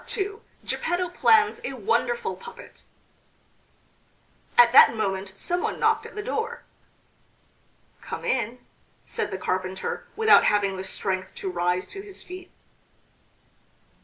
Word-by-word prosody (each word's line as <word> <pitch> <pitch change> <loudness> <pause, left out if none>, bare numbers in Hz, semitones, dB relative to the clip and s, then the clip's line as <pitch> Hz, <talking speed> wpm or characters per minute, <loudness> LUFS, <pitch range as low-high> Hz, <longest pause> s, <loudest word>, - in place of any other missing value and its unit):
II 405 0 -2 0.3
GEPPETTO 355 0 -1
PLANS 440 +5 +3
A - - -4
WONDERFUL 475 +1 -1
PUPPET 475 0 -12 1.8
At 240 -1 +8
that 240 - +8
moment 195 -2 -2
some 350 - -2
one - - -2
knocked - - +2
at - - -15
the 420 - -4
door. 465 0 -3 1.4
"Come - - -6
in," 240 -1 -1 0.5
said 455 - -2
the - - -4
carpenter, 185 0 -3
without 440 -1 +6
having 200 -2 +2
the 185 - -5
strength 190 -1 -2
to 190 - -4
rise 180 +1 0
to 390 - -7
his 395 -1 -10
feet. 365 0 -10
265 Hz, 125 wpm, -25 LUFS, -, 1.8 s, At